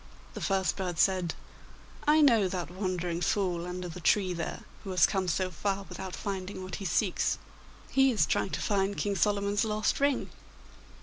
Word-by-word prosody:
The - - -7
first 190 -1 +1
bird 180 -3 -3
said: 185 -1 +2 0.7
'I 305 +1 +6
know 230 -9 +5
that 175 -3 -4
wandering 180 -2 -2
fool 180 -3 0
under 180 0 -4
the 175 +1 -7
tree 185 +2 +2
there, 170 -2 -4 0.2
who 200 - -7
has 180 -2 +5
come 190 -1 0
so 185 +2 0
far 195 +4 -2
without 190 -1 -6
finding 190 -1 -4
what 185 -1 -5
he 200 - -7
seeks. 185 +2 +1 0.5
He 270 0 +5
is 230 -5 +3
trying - - 0
to - - -3
find 200 -1 0
King 205 -1 0
Solomon's 200 +1 +1
lost 215 -1 0
ring. 280 -1 +1
190 Hz, 175 wpm, -29 LUFS, 180-205 Hz, 0.7 s, I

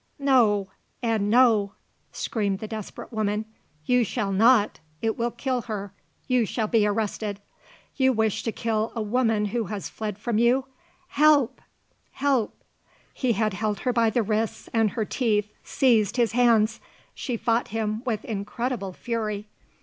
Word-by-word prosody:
no! 235 -9 +3 0.4
and 220 -3 +1
no!" 220 -4 +4 0.4
screamed 205 -4 -1
the 215 +2 -6
desperate 215 +2 -7
woman. 215 0 -1 0.4
"You 250 +4 +3
shall 200 -1 -2
not! 215 +2 +4 0.2
It 225 -1 0
will 235 +1 0
kill 255 0 -2
her! 200 -2 -4 0.3
You 250 -2 +3
shall 220 +1 -1
be 215 -1 +3
arrested! 205 -1 -2 0.6
You 265 -1 +4
wish 220 -3 0
to 225 - -2
kill 220 0 -1
a 230 - -1
woman 225 -1 +1
who 235 -2 0
has 205 0 -5
fled 210 -3 -5
from 215 +1 -1
you! 250 +3 +3 0.4
Help! 285 -5 +3 0.5
Help!" 270 -5 0 0.5
He 255 -3 0
had 215 0 0
her 215 +5 -1
by 230 -2 +3
the 230 +1 +1
wrists 215 +1 -2
and 225 -2 +3
her 220 +2 -2
teeth 210 -3 0
seized 230 -5 +2
his 235 -2 +2
hands. 230 -2 +3 0.3
She 245 -4 -3
fought 230 +1 +1
him 220 0 -2
with 225 -5 -2
incredible 215 0 -3
fury. 215 -1 -3
225 Hz, 150 wpm, -25 LUFS, 210-240 Hz, 0.6 s, no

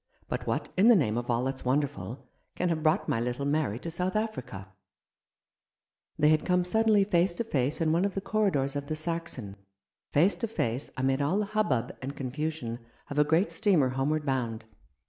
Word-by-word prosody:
But - - -4
what - - -1
in 195 +4 +5
the 240 - +8
name 125 - +2
of 120 +1 -3
all 120 +1 +1
that's 135 0 -3
wonderful 130 -4 -2 0.3
can 180 - 0
have 160 -2 0
brought 155 0 +2
my 115 - +1
little 125 +3 -2
Mary 145 -7 0
to 165 +6 -6
South 180 +3 -2
Africa? 125 - -4 0.7
" - - -58
They 150 0 +4
had 155 0 +3
come 180 0 +2
suddenly 215 +1 +3
face 180 -2 +2
to 235 - -2
face 145 - -1
in 160 -2 +2
one 170 +3 +2
of 200 -1 -1
the - - 0
corridors 185 -11 0
of 140 0 -3
the 155 - -2
Saxon; 155 - -4 0.5
face 175 +8 +4
to 230 - -2
face 130 - -2
amid 135 +1 +1
all 150 +7 +1
the 210 - +1
hubbub 200 - 0
and 135 +2 -5
confusion 135 -2 -3 0.3
of 145 - 0
a - - +7
great 160 +6 +2
steamer 180 - +3
homeward 145 +4 -1
bound. 120 -5 -2
150 Hz, 195 wpm, -29 LUFS, 130-180 Hz, 0.7 s, the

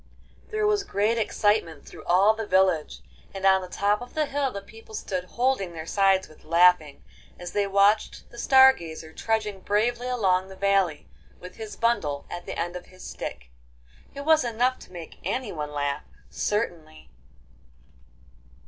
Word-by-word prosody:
There 430 -1 -1
was 420 -1 +2
great 220 - 0
excitement 205 -7 0
through - - -12
all 190 +5 +5
the 220 -1 -5
village, 185 -5 +2 0.3
and 195 0 -4
on 190 0 +5
the 185 - -7
top 205 +4 0
of 245 - -10
the 310 -1 +1
hill 280 -1 -1
the 200 - -6
people 220 +1 -13
stood 185 -3 -3
holding 235 -5 -1
their 160 -1 -7
sides 195 +1 +2
with 155 - -19
laughing, 165 -2 +3 0.3
as 175 -1 -7
they 205 -1 0
watched 200 +2 +2
the 240 - -11
Star 265 +1 +7
Gazer 160 -4 -9
trudging 215 -2 -2
bravely 235 +5 0
along 190 -7 +1
the 190 - -11
valley 195 -5 +1 0.3
with 180 - -11
his 220 -1 -7
bundle 155 -12 0
at 175 0 -7
the - - -5
end 175 +1 -3
of 180 - -8
his 185 0 -15
stick. - - -7 0.6
It 280 - -5
was 315 -2 +5
enough 245 +2 0
to - - -15
make 170 -3 -10
anyone 180 - -3
laugh, 145 -1 -2 0.3
certainly. 165 - -3
195 Hz, 165 wpm, -26 LUFS, 175-230 Hz, 0.6 s, Star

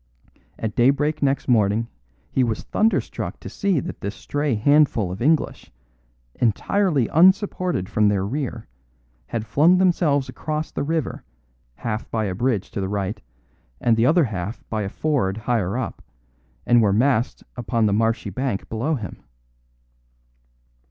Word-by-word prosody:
At 110 -2 -3
daybreak 140 +5 +2
next 140 -1 +1
morning 110 -2 +2 0.4
he 130 - +2
was 115 -3 -2
thunderstruck 220 +1 -1
to - - -9
see 195 -6 0
that - - -7
this 100 +3 -4
stray 145 -3 -1
handful 120 -5 +3
of 95 - -7
English, 155 +4 0 0.6
entirely 140 - +1
unsupported 185 - +3
from 105 +1 +2
their 100 -2 +1
rear, 120 -1 -4 0.6
had 115 -2 -3
flung 150 - +4
themselves 170 -7 +2
across 155 0 -4
the - - -3
river, 160 -1 -2 0.5
half 110 - -4
by 110 -1 -1
a 95 - -2
bridge 110 -1 -1
to 100 - -3
the 95 - -2
right, 100 0 -3 0.6
and 115 -2 +3
the 115 +2 +3
other 165 +3 +5
half 105 -3 -5
by 110 -1 -1
a 100 - -3
ford 125 -8 -1
higher 110 -3 -1
up, 130 - -4 0.6
and 120 -1 +5
were 105 -3 +3
massed 125 +2 +1
upon 115 -2 0
the 100 - +2
marshy 115 +2 0
bank 130 -6 -3
below 125 +8 -1
him. 105 - -7
120 Hz, 145 wpm, -22 LUFS, 105-150 Hz, 0.6 s, other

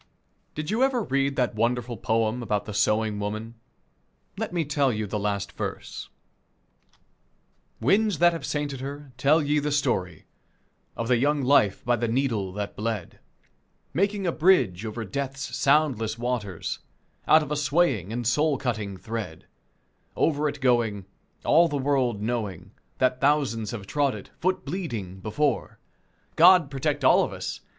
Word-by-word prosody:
Did 155 +3 -3
you 225 +4 0
ever 260 -3 +2
read 135 -3 0
that 125 -1 0
wonderful 120 +2 -1
poem 110 +2 0
about 105 -3 -1
the 105 - -6
sewing 105 +1 +1
woman? 110 +2 -4 0.8
Let 220 +2 -4
me 170 -2 -1
tell 145 -2 +1
you 110 -1 -2
the 105 +1 -3
last 100 -1 -2
verse: - - -6 1.7
"Winds 200 - +2
that 175 +1 +5
have 165 - -5
sainted 145 -3 -3
her, 140 +1 -7
tell 150 +4 +3
ye 150 +1 +2
the 150 +1 -2
story 90 - -1 0.7
Of 115 - -2
the 125 0 +3
young 145 +3 +1
life 125 -7 +3
by 120 0 +2
the 120 +1 -1
needle 115 -6 0
that 105 0 -5
bled, 110 -4 -4 0.7
Making 200 +2 0
a 175 - +2
bridge 130 - +3
over 110 +1 -5
death's 135 +6 -4
soundless 135 -7 +2
waters 115 -7 -3 0.5
Out 155 0 +6
of 150 - -8
a - - +1
swaying, 140 - +1
and 120 +1 -3
soul 145 +5 +2
cutting 110 -7 -3
thread 100 -4 -6 0.7
Over 150 -1 +1
it 145 0 -7
going, 115 -6 +1 0.4
all 170 +1 +5
the 145 -3 -2
world 130 -6 0
knowing 110 -6 -3 0.3
That 130 0 +1
thousands 135 -7 +1
have 110 -4 -6
trod 140 +2 0
it, 100 - -10
foot 185 +1 0
bleeding, 115 - -5
before: 135 +9 -1 0.6
God 175 -3 +6
protect 145 0 -1
all - - +6
of - - -3
us! - - -5
125 Hz, 155 wpm, -26 LUFS, 110-150 Hz, 1.7 s, Out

